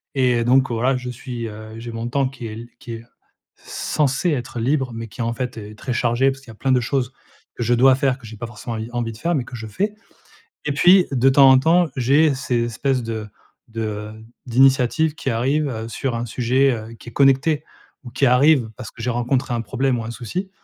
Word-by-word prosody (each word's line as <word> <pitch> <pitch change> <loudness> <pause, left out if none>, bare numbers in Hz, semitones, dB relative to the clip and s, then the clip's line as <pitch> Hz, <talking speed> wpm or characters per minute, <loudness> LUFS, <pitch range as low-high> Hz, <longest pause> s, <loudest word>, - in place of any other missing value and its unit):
et 125 -3 +2
donc 130 +2 +4
voilà, 125 +3 +1
je 125 0 -6
suis, 120 -1 -6
heu, 110 0 -9
j'ai 120 +1 -7
mon 115 +1 -4
temps 135 +1 +1
qui 125 -3 -8
est 110 +2 -7
qui 120 - -8
est 115 0 -8 0.5
censé 150 +4 -1
être 125 -4 -3
libre, 130 +2 0
mais 115 0 -6
qui, 115 - -8
en 115 0 -1
fait, 125 +2 -4
est 105 -1 -9
très 125 +3 -4
chargé, 120 +2 +2
parce 135 0 -9
qu'il 135 - -17
y - - -7
a - - -14
plein 130 +4 0
de 125 - +3
choses 125 +1 -1 0.4
que 120 - -3
je 120 +2 +2
dois 130 +2 +6
faire, 135 -1 +1
que 125 - -14
j'ai 110 - -9
pas 120 +2 -5
forcément 115 +1 -7
envie 110 +1 -5
envie 120 -2 -2
de - - -12
faire 170 +8 0
mais 130 -4 -1
que 125 - -9
je 110 -1 -7
fais 205 - -2 0.7
et 150 - +1
puis, 180 +6 +6
de 130 0 +4
temps 135 0 +7
en 130 - +7
temps, 165 +5 +3
j'ai 140 +4 +3
ces 125 -3 -1
espèces 125 +3 -1
de 110 -2 -4 0.4
de 110 -2 -4 0.3
d'initiatives 130 +4 +3
qui - - -5
arrivent, 135 +6 +1
heu, 110 -2 -5
sur 115 +2 -3
un 115 - -2
sujet, 125 +4 +2
heu, 115 -1 -6
qui 120 - -12
est - - -20
connecté 140 +4 +3 0.4
ou 120 - -8
qui 135 +3 0
arrivent 125 -1 +4
parce 115 - -8
que 115 - -11
j'ai 125 - 0
rencontré 120 +2 -1
un 120 - -1
problème 130 +1 0
ou - - -5
un 110 - -5
souci, 135 - -5
125 Hz, 235 wpm, -21 LUFS, 115-135 Hz, 0.7 s, temps